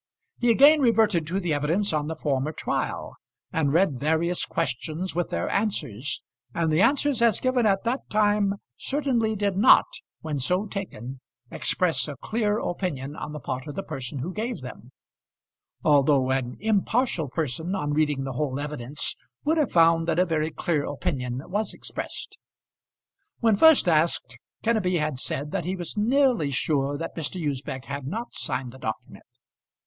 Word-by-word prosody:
He 245 - +2
again 285 +6 +7
reverted 220 - +3
to 185 +4 -1
the 175 -5 -1
evidence 160 +7 0
on 150 -1 0
the 160 - -3
former 145 -1 -1
trial, - - -3 0.4
and 150 -4 +1
read 160 -5 +2
various 160 +4 +1
questions 160 +5 -3
with 175 0 -1
their - - -2
answers; 145 - -2 0.3
and 165 -1 +1
the 155 +4 +3
answers 280 +1 +3
as 230 -4 +4
given 255 -3 +2
at 195 -1 +2
that 245 +3 -2
time 205 -1 +2 0.2
certainly 255 -6 0
did 200 -2 0
not, 200 - +7 0.4
when 155 -3 -3
so 180 +10 +1
taken, 135 - -6 0.3
express 160 -8 +1
a 145 - -5
clear 215 -2 0
opinion 150 - -3
on 150 - -6
the 150 - -6
part 130 +1 -5
of 145 - -6
the 195 - -3
person 135 -2 -5
who 165 +8 -4
gave 225 - -3
them; 125 -1 -10 0.9
although 140 -3 +4
an 130 -2 -1
impartial 215 - +1
person 160 +5 -2
on 145 -6 -1
reading 150 -2 +1
the 135 -1 -4
whole 135 +1 -2
evidence 145 -2 -2 0.3
would 315 +2 +2
have 295 - +1
found 165 -1 +4
that 165 -1 +1
a 180 - +4
very 160 -2 0
clear 155 -1 -1
opinion 130 -2 -3
was 210 +4 -2
expressed. - - -6 1.0
When 225 -3 +4
first 320 - +6
asked, 155 -7 +1 0.2
Kenneby 205 -6 +2
had 150 -4 -1
said 145 +3 -3
that 185 -5 -2
he 185 +2 -1
was 175 -2 -5
nearly 240 - +2
sure 140 0 0
that 165 - -5
Mr. 165 +3 -3
Usbech 135 -4 -3
had 140 -1 -5
not 225 - -4
signed 125 -2 -3
the 130 - -13
document. 110 -3 -6
165 Hz, 165 wpm, -26 LUFS, 140-205 Hz, 1.0 s, again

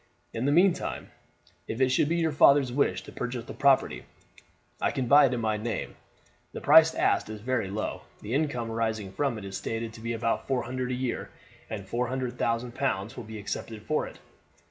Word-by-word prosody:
In 115 +3 -2
the 140 - +3
meantime, 175 +4 +2 0.6
if 110 - -4
it 130 -1 +4
should 135 +3 +2
be 170 - +1
your 165 -2 +1
father's 140 -3 +5
wish 140 +2 +1
to - - -11
purchase 125 -1 -4
the - - -8
property, 140 -1 +2 0.8
I - - +2
can 130 - -2
buy 140 +3 +7
it 125 - -2
in - - -2
my 110 -1 0
name. 110 -1 -4 0.6
The - - -5
priced 160 +2 +6
asked - - +1
is 110 -1 -6
very 120 -4 -1
low. 105 +3 -3 0.2
The 105 +3 -5
income 130 -6 -1
arising 110 -3 -2
from 135 0 -1
it 105 - -7
is 95 0 -6
stated 115 0 -4
to 110 - -11
be 115 +1 -2
about 115 0 -1
four 130 -3 0
hundred 130 0 -3
a 125 - -1
year, 125 -1 -3 0.4
and 100 -3 -6
four 120 +3 -1 0.2
thousand 120 0 -1
pounds 120 -4 -2
will 120 - -7
be 110 0 -8
accepted 105 +1 -5
for 155 +6 0
it. - - -12
120 Hz, 205 wpm, -28 LUFS, 110-135 Hz, 0.8 s, buy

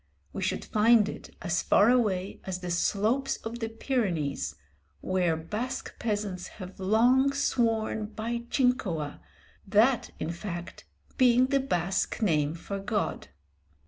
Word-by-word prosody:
We - - -4
should - - -1
find 220 0 +4
it - - -8
as 175 0 +1
far 210 +4 +5
away 200 -6 0
as 185 -1 -4
the 180 -1 -4
slopes 215 +9 +1
of 230 +1 -5
the 225 -1 -2
Pyrenees, 170 - -1 0.5
where 180 -3 +1
Basque 220 +11 -4
peasants 205 -5 -2
have 185 -2 -9
long 245 +8 +4
sworn 225 -6 0
by 225 +2 -3
Jincoa, 195 - 0 0.5
that 225 +5 +3
in 165 - -2
fact 175 -1 -7 0.3
being 250 0 +6
the 275 +1 +2
Basque 190 -7 -1
name 155 -7 +1
for 195 +4 -5
God. 205 +1 -2
210 Hz, 130 wpm, -28 LUFS, 180-235 Hz, 0.5 s, being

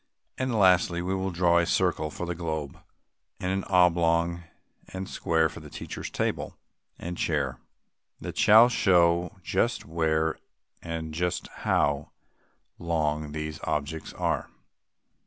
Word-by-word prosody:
And 130 -2 -2
lastly, 90 -3 +4
we 95 +2 -1
will 95 0 -1
draw 85 -1 +3
a 85 - +2
circle 90 -4 +1
for 90 - -5
the 85 - -2
globe, 80 -4 -4 0.6
and 90 - -2
an 95 0 -1
oblong 85 -1 +2 0.4
and 95 0 -6
square 80 -1 +1
for - - -10
the - - -11
teacher's - - -6
table - - -3 0.4
and 85 +1 -6
chair, 70 -5 -1 0.6
that - - -6
shall 110 +3 +7
show 90 -7 +2
just - - 0
where 80 -1 0 0.4
and 80 -2 -5
just 90 +2 -2 0.2
how 70 0 +1 0.7
long 75 -3 -1
these 75 0 -5
objects 75 +2 -3
are. - - -1
85 Hz, 130 wpm, -27 LUFS, 80-90 Hz, 0.7 s, shall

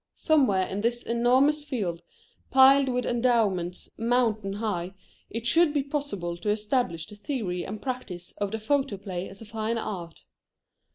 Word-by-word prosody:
Somewhere 255 -12 +3
in 195 +2 -4
this 235 +2 0
enormous 255 +6 +3
field, 200 - -3 0.5
piled 270 +1 +6
with 250 0 0
endowments 220 -8 +1
mountain 225 -4 +1
high, 195 -4 -3 0.3
it 230 +1 -5
should 325 +4 +4
be 285 - +2
possible 270 - -3
to 180 +5 -3
establish 210 - 0
the 210 - -11
theory 205 - -3
and 215 - -6
practice 210 -10 -5
of 205 -1 0
the 220 - -3
photoplay 210 -7 -1
as 195 +3 -11
a - - -11
fine 220 +2 -2
art. 175 -7 -6
220 Hz, 150 wpm, -27 LUFS, 190-255 Hz, 0.5 s, piled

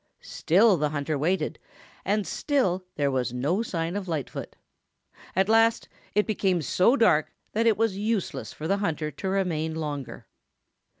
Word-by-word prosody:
Still 195 +3 +3
the 150 -1 0
hunter 150 +1 -2
waited, 155 +1 -1 0.4
and 205 +1 0
still 195 - 0
there 140 -1 +1
was 125 -2 -1
no 145 - 0
sign 170 -5 -3
of 200 -2 -4
Lightfoot. 155 -6 -4 0.8
At 190 +1 +3
last 225 +1 +3 0.3
it 210 - +3
became 190 -5 0
so 185 - +3
dark 155 - +3 0.2
that 225 +2 +1
it 225 - +4
was 220 -3 +1
useless 215 -2 -2
for 155 - -6
the 195 +3 +2
hunter 160 -6 -2
to 170 +7 -4
remain 165 -5 -1
longer. 145 -5 -5
180 Hz, 155 wpm, -26 LUFS, 155-210 Hz, 0.8 s, it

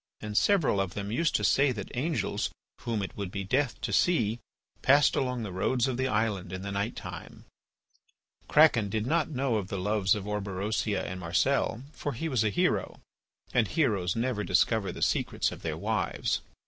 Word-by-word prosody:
And 105 -1 -6
several 160 - +3
of 95 -1 -4
them 100 0 -4
used 150 +7 +1
to - - +1
say 140 0 +4
that 105 0 -7
angels, 155 +6 -1 0.3
whom 115 -4 -2
it 95 - -6
would 100 -2 -4
be 100 +1 -4
death 130 +6 0
to - - -2
see, 115 -10 +2 0.4
passed 140 +1 +5
along 125 -3 -1
the 105 - -5
roads 120 +8 +1
of 130 - -1
the 130 +1 0
island 105 -6 -1
in 95 0 -5
the 100 - -4
night 100 +4 -2
time. - - -9 1.0
Kraken 125 -9 +5
did 110 +1 -1
not 160 +4 +1
know 130 -5 0
of 100 -3 -3
the 100 - -4
loves 100 0 +2
of 100 -2 -5
Orberosia 105 0 -1
and 90 0 -5
Marcel, 110 +7 +1
for 145 - -4
he 145 +8 -3
was 125 -6 +1
a 110 - +2
hero, 100 - 0 0.5
and 120 -4 +3
heroes 100 - +1
never 115 -2 -1
discover 100 +2 +2
the - - -4
secrets - - +1
of - - -9
their - - -3
wives. - - -1
110 Hz, 185 wpm, -29 LUFS, 100-130 Hz, 1.0 s, passed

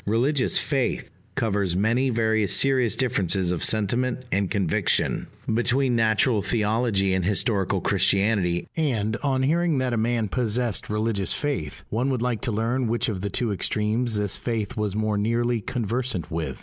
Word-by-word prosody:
"Religious 125 +6 +2
faith" 135 -4 -1 0.2
covers 100 -5 0
many 120 +6 +2
very 110 -3 +1
serious 125 0 +2
differences 95 -7 0
of 90 - -2
sentiment 120 +4 +1
and 100 -1 0
conviction, 95 -6 0 0.3
between 125 +2 +2
natural 110 0 +2
theology 105 -1 +1
and 95 -1 0
historical 100 0 +1
Christianity; 95 -4 +1
and, 115 -9 0
on 135 -2 0
hearing 165 +2 +2
that 130 -1 0
a - - 0
man 115 0 0
possessed 120 0 -1
religious 105 -2 -1
faith, 140 - -3
one 120 +5 0
would 125 -3 -1
like 125 -3 -1
to - - -1
learn 115 +4 0
which 115 +1 0
of 95 -4 -4
the 100 - -2
two 115 +3 -1
extremes 110 +4 0
this 100 -1 -1
faith 110 -4 -3
was 105 -3 -2
more 110 -1 0
nearly 115 +2 0
conversant 115 - -2
with. 80 -5 -3
110 Hz, 155 wpm, -24 LUFS, 100-125 Hz, 0.3 s, Religious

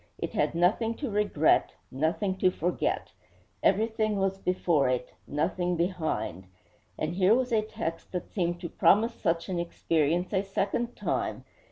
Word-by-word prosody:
It - - -4
had - - 0
nothing 215 +7 +2
to 275 -3 -4
regret, 200 -7 +2 0.2
nothing 165 +8 0
to 185 - +4
forget. 180 0 -1 0.5
Everything 215 +1 +2
was 195 0 0
before 170 -7 +2
it; 125 -1 -2
nothing 175 +4 0
behind. 160 - -2 0.5
And 155 +2 -2
here 190 +4 +4
was 255 0 0
a 220 -2 +3
text 215 -6 -5
that 180 - -4
seemed 175 -3 -1
to 170 - -4
promise 225 +8 +4
such 165 -6 -1
an 180 -2 -2
experience 170 +1 0
a 190 - +3
second 200 +4 -2
time! - - -2
180 Hz, 150 wpm, -28 LUFS, 165-210 Hz, 0.5 s, to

